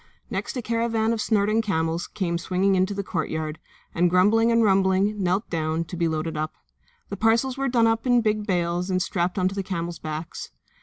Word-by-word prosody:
Next - - -3
a 245 - -3
caravan 230 0 0
of 225 - -2
snorting 215 +1 +2
camels 165 -5 -1
came 170 -4 -2
swinging 190 +2 +1
in 185 0 +3
to 205 - -4
the 200 - -2
courtyard 160 -3 -3 0.3
and, 175 +1 +3
grumbling 210 +6 +4
and 230 0 +4
rumbling, 195 +1 +2
knelt 185 +4 0
down, 160 0 -1
to 165 +2 -8
be 170 -1 +1
loaded 160 0 -2
up. 155 +1 -3 0.5
The 200 - -5
parcels 230 +5 +2
were 275 0 -1
done 235 -2 +3
up 225 +2 +1
in 245 -1 +4
big 215 -1 0
bales 175 -1 0
and 185 -1 +1
strapped 180 0 -1
on 185 -1 +2
to - - -7
the 195 - -2
camels' 175 -3 -4
backs. 155 +1 -6
190 Hz, 205 wpm, -24 LUFS, 170-220 Hz, 0.5 s, grumbling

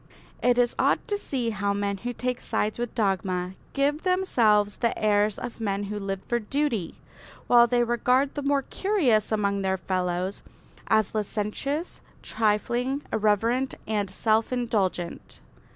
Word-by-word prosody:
It 245 -1 +3
is 245 -1 +3
odd - - +2
to 410 - +1
see 260 - -2
how 200 -1 -1
men 200 0 -1
who 240 +5 -4
take 250 +1 -3
sides 215 +2 -1
with 240 -1 -3
dogma 185 -3 0 0.2
give 285 +2 +1
themselves 230 - +2
the 235 - 0
airs 210 -1 +2
of 235 - -7
men 200 -2 -1
who 205 +1 -4
live 195 -1 -3
for 240 - +1
duty, 235 - -1 0.5
while 240 -1 +6
they 240 0 +2
regard 250 +3 +2
the 290 - -3
more 280 0 +1
curious 275 - +1
among 200 -2 +1
their 190 0 0
fellows 185 +1 -2 0.5
as 220 -2 +2
licentious, 220 - -3 0.2
trifling, 235 +5 0
irreverent 225 +5 +1
and 210 -2 -1
self 220 +4 +1
indulgent. 205 -8 -2
220 Hz, 145 wpm, -26 LUFS, 200-250 Hz, 0.5 s, while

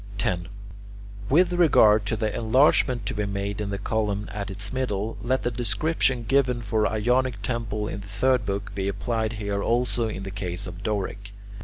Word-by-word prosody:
10. 90 -4 -1 0.8
With 175 +5 +4
regard 110 -12 +5
to 110 - 0
the 110 -1 -2
enlargement 125 0 +3
to - - -2
be 105 -1 -2
made 100 +1 -3
in 105 - -3
the 100 - -2
column 105 0 -1
at 100 -1 -4
its 100 +3 -3
middle, 115 -5 -2
let 130 +2 0
the 120 - 0
description 120 +2 0
given 125 0 +1
for 110 -1 +1
Ionic 120 0 0
columns 105 -2 -2
in 100 - -5
the 100 - -11
third 120 +5 +2
book 100 0 -3
be 100 -1 -2
applied 110 +2 -1
here 100 -2 -2
also 120 0 +1
in 100 -3 -5
the 95 - -5
case 95 -1 -4
of 90 0 -8
Doric. 100 -1 -3
105 Hz, 180 wpm, -25 LUFS, 100-120 Hz, 0.8 s, regard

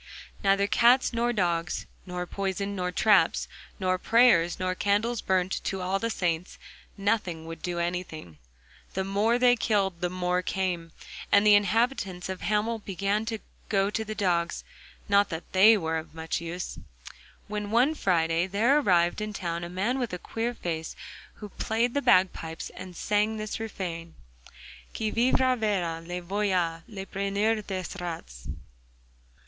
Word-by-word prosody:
Neither 200 0 +3
cats 240 +5 +4
nor 235 +1 +1
dogs, 175 -5 -1 0.2
nor 180 0 -3
poison 200 +2 -3
nor 180 -1 -2
traps, 195 -3 +3 0.3
nor 185 -1 +1
prayers 220 -7 +4
nor 185 0 0
candles 210 +5 0
burnt 185 0 0
to 195 - -2
all 190 +2 0
the 230 - -1
saints—nothing 180 0 -3
would 165 0 -8
do 175 -1 -3
anything. 170 - -4 0.6
The 190 - 0
more 205 +5 +2
they 245 0 +5
killed 195 -7 0
the 180 - 0
more 180 0 0
came. 180 -3 -2 0.4
And 200 +1 +5
the 210 - +7
inhabitants 205 -3 +1
of 190 -1 -5
Hamel 215 +2 0
began 200 +2 -1
to 225 0 -2 0.3
go 195 -1 +2
to 220 - -1
the 215 0 -6
dogs 175 -4 0 0.4
(not 200 0 +4
that 160 +1 -7
they 210 +4 +7
were 160 -3 -1
of 160 0 -8
much 160 +1 -3
use), 170 +2 -5 0.7
when 210 -1 -4
one 245 +7 +3
Friday 170 - +1
there 230 +9 +3
arrived 175 -6 +2
in 215 0 -3
the - - -5
town 170 -1 -3
a 170 - -5
man 205 +9 -1
with 240 -6 -3
a - - -2
queer 230 +6 -3
face, 160 -4 -4 0.4
who 210 - -9
played 230 +4 -1
the 285 - +1
bagpipes 180 -6 +1
and 180 -1 -10
sang 210 +4 0
this 215 +1 -4
refrain: 175 -6 -5 0.8
'Qui 220 -1 -1
vivra 255 +2 +3
verra: 185 -8 -1
Le 175 +1 -6
voilà, 180 -3 0
Le 195 -3 -7
preneur 200 +3 0
des 185 -2 -3 0.2
rats. - - -7
195 Hz, 155 wpm, -27 LUFS, 175-215 Hz, 0.8 s, the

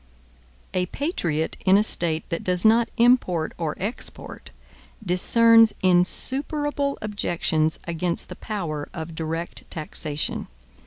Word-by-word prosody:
A 180 0 0
patriot 170 - -2
in 190 +1 +5
a 210 - +3
State 165 -6 +2
that 165 - -3
does 180 +1 +1
not 230 +2 +4
import 230 -9 +2
or 160 -3 -2
export, 205 +6 -6 0.6
discerns 225 +5 +5
insuperable 280 - +1
objections 170 -6 -1
against 170 +1 -2
the - - -9
power 165 -9 -5
of 160 0 -6
direct 165 +1 -5
taxation. 155 -1 -4
180 Hz, 110 wpm, -23 LUFS, 160-225 Hz, 0.6 s, in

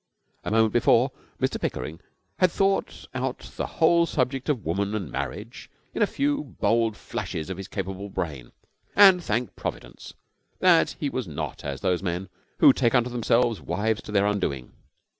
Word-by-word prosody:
A - - -3
moment 110 0 +3
before 120 +2 +4 0.3
Mr - - -1
Pickering 75 +6 -3 0.4
had 185 - +5
thought 195 +1 0
out 130 0 -2 0.2
the - - -2
whole 170 +1 +3
subject 135 -1 -1
of 130 -8 -1
woman 100 +6 -1
and 95 -8 -4
marriage 110 +4 -5 0.2
in - - -3
a 210 - +5
few 290 +4 0 0.2
bold 115 -2 +2
flashes 80 -2 -5
of - - -5
his 95 0 -7
capable 95 0 -5
brain, 75 -10 -5 0.4
and 190 -3 +7
thanked 120 0 -2
Providence - - -7 0.4
that 175 -3 +4
he 145 - -1
was 130 -5 -3
not 75 - -5
as 70 -2 -5
those 90 -1 +1
men 90 0 -3 0.3
who - - +7
take 120 +2 +2
unto 125 0 +2
themselves 120 -1 +1
wives 110 +2 -1
to - - -9
their 100 -1 +3
undoing. 95 -11 -1
110 Hz, 165 wpm, -25 LUFS, 95-130 Hz, 0.4 s, and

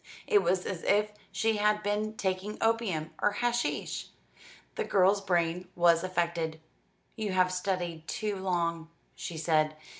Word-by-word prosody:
It 420 -3 +4
was 185 0 +1
as 180 -3 -3
if 210 +1 +2 0.2
she 225 -1 +1
had 210 0 +2
been 215 +1 -1
taking 190 +2 -2
opium 220 -9 0
or 210 - +3
hashish. 240 +2 -1 0.7
The - - -2
girl's 195 +1 +3
brain 175 -1 0
was 170 -1 +4
affected. 170 -3 -1 0.6
"You 215 -4 -2
have 185 0 +3
studied 180 -3 -2
too 210 -2 -2
long," 170 -3 -1 0.2
she 165 - -6
said. 155 -1 +2
185 Hz, 140 wpm, -30 LUFS, 170-210 Hz, 0.7 s, It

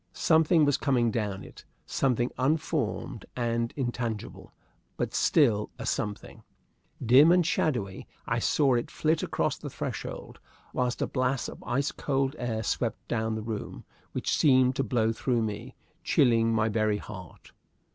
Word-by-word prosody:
Something 160 0 +4
was 145 -1 +2
coming 120 -5 +1
down 105 -4 -2
it - - -13 0.2
something 125 -2 0
unformed 140 -4 -1
and 115 -1 -1
intangible, 120 -5 -4 0.5
but - - -2
still 115 -10 +3
a - - -6
something. 105 -1 -3 0.6
Dim 135 +8 +7
and 180 -1 +4
shadowy, 120 -12 -1 0.2
I - - 0
saw 140 -3 +2
it 120 -1 0
flit 160 +1 0
across - - -1
the - - -6
threshold, - - -6 0.3
while 125 -1 0
a - - +1
blast 130 -2 -1
of - - -11
ice 140 +3 0
cold 135 0 -1
air 115 -2 -2
swept 115 +2 -2
down 110 -1 -1
the 110 - -4
room, 110 -2 -6 0.3
which - - -1
seemed 130 -3 +4
to 135 - +1
blow 115 -3 +1
through 120 0 0
me, 105 -1 -5 0.3
chilling 115 -3 +3
my 110 -1 +2
very 110 -1 +1
heart. 95 -4 -11
120 Hz, 145 wpm, -28 LUFS, 110-135 Hz, 0.6 s, Dim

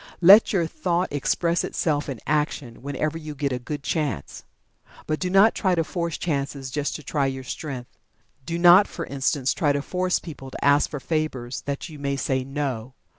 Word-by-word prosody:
Let 195 +5 +8
your 180 -5 +2
thought 175 +2 -1
express 170 +4 +1
itself 145 -3 -1
in 130 -5 -5
action, 150 -5 -1
whenever 145 +4 -2
you 155 -2 -7
get 140 0 -1
a 125 - -2
good 145 +3 -6
chance. 145 - -3 0.6
But 155 0 -1
do 180 - -1
not 195 +4 +6
try 185 -3 +1
to 165 - +1
force 170 0 -3
chances 140 -4 -3
just 145 +1 -2
to 150 - -7
try 140 0 0
your 135 0 -4
strength. 130 -1 -7 0.4
Do 170 +4 -3
not, 175 +4 +7
for 170 - -6
instance, 135 0 0
try 145 -3 +1
to 140 - -1
force 180 +1 0
people 140 -5 -9
to - - -5
ask 145 +1 +4
for 145 - -5
favors 135 -5 -2
that 140 +4 -3
you 155 -4 -11
may 140 0 -1
say 130 -1 -1
"No!" 135 -3 -4
145 Hz, 190 wpm, -24 LUFS, 135-170 Hz, 0.6 s, Let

